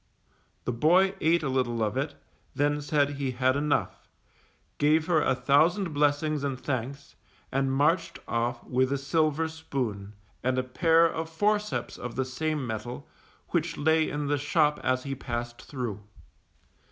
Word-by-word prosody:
The -, -, 0 dB
boy 180 Hz, +10 st, +4 dB
ate 165 Hz, +1 st, +3 dB
a -, -, 0 dB
little 125 Hz, -3 st, 0 dB
of 105 Hz, +1 st, -1 dB
it, 140 Hz, +2 st, -2 dB, 0.4 s
then 145 Hz, +1 st, +1 dB
said 145 Hz, -1 st, +1 dB
he 140 Hz, -2 st, -3 dB
had 130 Hz, +1 st, +1 dB
enough, 145 Hz, +1 st, -1 dB, 0.7 s
gave 155 Hz, +2 st, +3 dB
her 165 Hz, -3 st, +3 dB
a 130 Hz, -, +2 dB
thousand 155 Hz, +8 st, +2 dB
blessings 145 Hz, 0 st, +1 dB
and 135 Hz, -3 st, -2 dB
thanks, 140 Hz, +2 st, -4 dB, 0.4 s
and 135 Hz, 0 st, +1 dB
marched 150 Hz, +6 st, +1 dB
off 120 Hz, +1 st, -1 dB
with 130 Hz, +1 st, +1 dB
a 140 Hz, -, +1 dB
silver 155 Hz, +2 st, +1 dB
spoon, 125 Hz, -11 st, -4 dB, 0.3 s
and 130 Hz, +1 st, +1 dB
a 130 Hz, -, +1 dB
pair 165 Hz, +6 st, +4 dB
of 160 Hz, 0 st, -2 dB
forceps 210 Hz, +5 st, -1 dB
of 125 Hz, -1 st, -6 dB
the 130 Hz, -, 0 dB
same 150 Hz, +2 st, -2 dB
mettle, 115 Hz, +2 st, -5 dB, 0.4 s
which -, -, -1 dB
lay 160 Hz, +1 st, +3 dB
in 145 Hz, 0 st, -3 dB
the 145 Hz, 0 st, 0 dB
shop 150 Hz, +1 st, +2 dB
as 130 Hz, 0 st, +1 dB
he 140 Hz, -, -3 dB
passed 120 Hz, -2 st, -5 dB
through. 120 Hz, -7 st, -5 dB
140 Hz, 155 wpm, -28 LUFS, 130-155 Hz, 0.7 s, boy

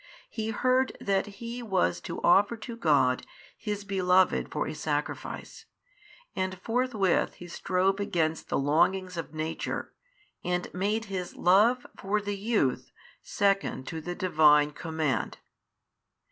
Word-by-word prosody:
He 220 Hz, -1 st, -3 dB
heard 255 Hz, +4 st, +1 dB
that 195 Hz, 0 st, 0 dB
he 235 Hz, +4 st, -7 dB
was 190 Hz, -6 st, 0 dB
to 170 Hz, -, -5 dB
offer 205 Hz, +6 st, +4 dB
to 235 Hz, +1 st, -7 dB
God 145 Hz, -, +2 dB, 0.3 s
his 210 Hz, -2 st, -4 dB
beloved 185 Hz, -2 st, +2 dB
for 150 Hz, -, -1 dB
a -, -, -4 dB
sacrifice 150 Hz, -1 st, -4 dB, 0.7 s
and 185 Hz, -1 st, -2 dB
forthwith 225 Hz, -3 st, +1 dB
he 175 Hz, -, -10 dB
strove 185 Hz, +3 st, 0 dB
against 165 Hz, -5 st, -1 dB
the -, -, +1 dB
longings 180 Hz, +6 st, +2 dB
of 165 Hz, -1 st, -6 dB
nature, 155 Hz, +1 st, -3 dB, 0.5 s
and 180 Hz, 0 st, -2 dB
made 210 Hz, +5 st, -1 dB
his 185 Hz, -3 st, -5 dB
love 215 Hz, +8 st, +4 dB
for 200 Hz, +2 st, -1 dB
the 205 Hz, 0 st, -3 dB
youth 200 Hz, -, 0 dB, 0.3 s
second 195 Hz, -9 st, 0 dB
to 160 Hz, -, -5 dB
the 175 Hz, +3 st, -5 dB
Divine 150 Hz, -5 st, +4 dB
Command. 155 Hz, -6 st, -2 dB
185 Hz, 130 wpm, -28 LUFS, 160-205 Hz, 0.7 s, offer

